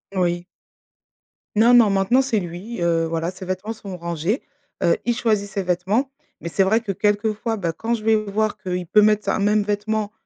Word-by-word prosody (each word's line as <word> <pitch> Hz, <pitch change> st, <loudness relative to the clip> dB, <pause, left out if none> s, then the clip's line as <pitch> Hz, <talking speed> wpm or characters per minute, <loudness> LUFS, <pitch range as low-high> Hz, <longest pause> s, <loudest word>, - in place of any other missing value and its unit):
Oui. 175 Hz, -1 st, 0 dB, 1.1 s
Non, 230 Hz, +3 st, +5 dB
non 235 Hz, -4 st, +7 dB
maintenant 195 Hz, +7 st, +3 dB
c'est 245 Hz, -6 st, 0 dB
lui, 180 Hz, +5 st, -6 dB
heu, 165 Hz, -1 st, +2 dB
voilà 165 Hz, +2 st, -2 dB
ses 185 Hz, 0 st, -10 dB
vêtements 185 Hz, +4 st, -3 dB
sont 195 Hz, -4 st, -8 dB
rangés, 170 Hz, -, -2 dB, 0.4 s
heu, 170 Hz, -, +4 dB
il 240 Hz, -1 st, +1 dB
choisit 215 Hz, -4 st, 0 dB
ses 195 Hz, 0 st, -3 dB
vêtements. 190 Hz, +10 st, 0 dB, 0.3 s
Mais 170 Hz, -, -5 dB
c'est 195 Hz, +3 st, +2 dB
vrai 220 Hz, +4 st, +2 dB
que 205 Hz, -4 st, -3 dB
quelques 210 Hz, +2 st, +1 dB
fois, 225 Hz, +1 st, -3 dB
bah, 170 Hz, -4 st, -2 dB
quand 230 Hz, +6 st, -1 dB
je 215 Hz, -, -8 dB
vais 220 Hz, 0 st, +4 dB
voir 215 Hz, 0 st, -1 dB
qu'il 180 Hz, -1 st, -3 dB
peut 210 Hz, +5 st, +4 dB
mettre 210 Hz, 0 st, +3 dB
un -, -, +1 dB
même 210 Hz, +1 st, +2 dB
vêtement, 210 Hz, +1 st, -2 dB
205 Hz, 200 wpm, -22 LUFS, 180-220 Hz, 1.1 s, non